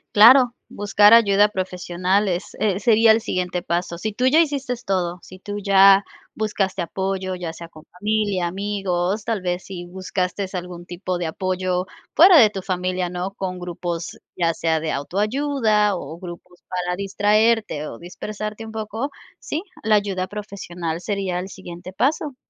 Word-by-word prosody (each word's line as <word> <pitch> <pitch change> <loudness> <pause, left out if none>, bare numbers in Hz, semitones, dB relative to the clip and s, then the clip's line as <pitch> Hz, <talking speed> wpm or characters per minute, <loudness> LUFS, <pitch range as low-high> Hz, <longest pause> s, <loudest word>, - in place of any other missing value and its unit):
Claro. 240 +3 +8 0.2
Buscar 205 +1 +4
ayuda 205 -2 +6
profesional, 185 +1 -1
es 180 +1 -4
eh, 200 -3 +1
sería 225 -1 +5
el 220 - +4
siguiente 180 -4 -2
paso. 170 0 -2
Si 215 +4 -3
tú 250 +4 +1
ya 300 +5 +5
hiciste 280 -5 -1
todo, 180 -2 -1
si 185 - -13
tú 205 +2 -6
ya 195 0 +6 0.3
buscaste 200 -3 -1
apoyo, 190 +1 -3
ya 175 -2 -5
sea 170 +1 -10
con 155 -1 -15
familia, 205 -2 0
amigos, 195 0 -2
tal 225 -4 -1
vez 180 0 -2
si 175 -2 -7
buscaste 185 +1 -3
algún 180 -1 -6
tipo 180 +1 -4
de 175 - -3
apoyo 185 +1 -1 0.3
fuera 350 +1 +8
de 220 -5 +7
tu 195 -2 -6
familia, 180 -1 -2
¿no?, 180 +2 -4
con 185 -1 -4
grupos, 175 -1 -5 0.2
ya 170 -2 +2
sea 160 0 0
de 155 0 -2
autoayuda 210 - +1
o 155 +1 -7
grupos 175 0 -11
para 180 -1 -2
distraerte 205 -3 +1
o 115 - -9
dispersarte 210 +5 -6
un 220 - -8
poco, 220 +5 -4 0.3
sí, 315 +4 -4 0.2
la 215 0 +4
ayuda 195 -3 0
profesional 180 -5 -5
sería 195 -3 -2
el 190 +2 -6
siguiente 180 -1 -9
paso. 275 +6 0
190 Hz, 160 wpm, -22 LUFS, 180-210 Hz, 0.3 s, Claro